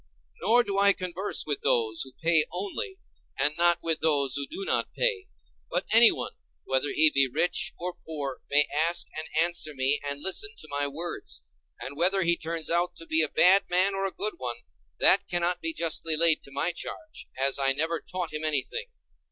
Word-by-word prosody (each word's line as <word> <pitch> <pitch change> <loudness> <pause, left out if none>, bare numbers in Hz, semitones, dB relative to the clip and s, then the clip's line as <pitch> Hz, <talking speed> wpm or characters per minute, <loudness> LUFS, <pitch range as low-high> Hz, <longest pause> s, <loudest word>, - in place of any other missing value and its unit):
Nor 240 +2 +4
do 200 -2 -2
I 200 0 +5
converse 185 +2 -4
with 145 -2 -4
those 110 -2 0
who 130 - -2
pay 165 -2 +3
only, 205 - -4 0.4
and 145 +3 +1
not 175 +1 +3
with 165 -1 0
those 140 -4 +1
who 140 - -1
do 380 +5 -5
not - - -1
pay; 460 -6 -1 0.4
but - - -2
any 230 0 +8
one, - - -5 0.3
whether 135 +2 -1
he 155 0 +5
be 140 -1 +3
rich 165 +6 0
or 180 +1 -3
poor, 145 -4 -6
may 145 +1 +4
ask 165 +3 +3
and 155 +1 -4
answer 165 -3 +3
me 135 +2 +1
and 140 0 -4
listen 415 - 0
to - - -9
my 145 0 -1
words; 160 - -7 0.4
and 140 - -8
whether 185 +5 +2
he 170 0 +3
turns 165 -1 -4
out 175 +1 +1
to 165 - -8
be 160 0 +3
a 155 - +1
bad 190 +2 +4
man 185 +3 +1
or 195 0 -1
a - - -2
good 210 +3 -4
one; 120 -2 -6 0.4
that - - +4
cannot 175 0 0
be 165 - -1
justly 165 0 +1
laid 165 -1 +4
to 140 - -13
my 140 +5 -1
charge, 315 - -9
as 135 +1 +1
I 135 0 +3
never 160 +4 -1
taught 180 -4 -6
him 155 0 -4
anything. 155 - -3
165 Hz, 200 wpm, -26 LUFS, 145-185 Hz, 0.4 s, any